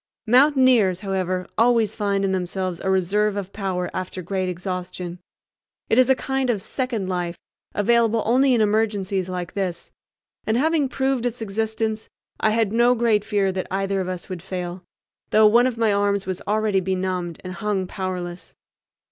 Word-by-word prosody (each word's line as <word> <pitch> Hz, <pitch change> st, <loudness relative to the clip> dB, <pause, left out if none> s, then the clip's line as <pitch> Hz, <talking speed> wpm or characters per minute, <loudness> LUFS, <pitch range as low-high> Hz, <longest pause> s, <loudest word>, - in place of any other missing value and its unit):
Mountaineers, 250 Hz, -7 st, +4 dB
however, 185 Hz, -2 st, -2 dB
always 230 Hz, -2 st, +3 dB
find 200 Hz, -2 st, 0 dB
in 195 Hz, -, 0 dB
themselves 185 Hz, -1 st, -2 dB
a 190 Hz, -, -2 dB
reserve 195 Hz, +3 st, +1 dB
of 200 Hz, -1 st, -5 dB
power 185 Hz, -3 st, -2 dB
after 185 Hz, 0 st, -5 dB
great 185 Hz, +1 st, -2 dB
exhaustion. 180 Hz, -1 st, -5 dB, 0.7 s
It 225 Hz, -, +5 dB
is 255 Hz, 0 st, +5 dB
a 265 Hz, -, +6 dB
kind 265 Hz, 0 st, -1 dB
of 225 Hz, -4 st, +1 dB
second 230 Hz, -1 st, -3 dB
life, 175 Hz, -2 st, -2 dB, 0.4 s
available 230 Hz, +1 st, +3 dB
only 255 Hz, +3 st, +4 dB
in 230 Hz, -, +2 dB
emergencies 205 Hz, -3 st, 0 dB
like 180 Hz, -1 st, -4 dB
this; 185 Hz, -3 st, -3 dB, 0.5 s
and, 220 Hz, +1 st, 0 dB
having 305 Hz, 0 st, +2 dB
proved 265 Hz, -2 st, 0 dB
its 245 Hz, 0 st, -5 dB
existence, 220 Hz, +1 st, -2 dB, 0.3 s
I 220 Hz, -, +3 dB
had 220 Hz, -1 st, +1 dB
no 240 Hz, +2 st, +4 dB
great 225 Hz, -3 st, +2 dB
fear 205 Hz, -3 st, +1 dB
that 185 Hz, 0 st, -4 dB
either 195 Hz, 0 st, -1 dB
of 185 Hz, -, -4 dB
us 185 Hz, -1 st, -5 dB
would 185 Hz, -3 st, -6 dB
fail, 180 Hz, -1 st, -5 dB, 0.5 s
though 215 Hz, 0 st, +5 dB
one 235 Hz, +4 st, +6 dB
of 245 Hz, -3 st, -3 dB
my 225 Hz, -3 st, +2 dB
arms 200 Hz, -1 st, +1 dB
was 185 Hz, 0 st, -4 dB
already 210 Hz, -1 st, +2 dB
benumbed 185 Hz, -2 st, -2 dB
and 185 Hz, 0 st, -6 dB
hung 205 Hz, -2 st, -1 dB
powerless. 180 Hz, -1 st, -5 dB
200 Hz, 165 wpm, -23 LUFS, 185-225 Hz, 0.7 s, a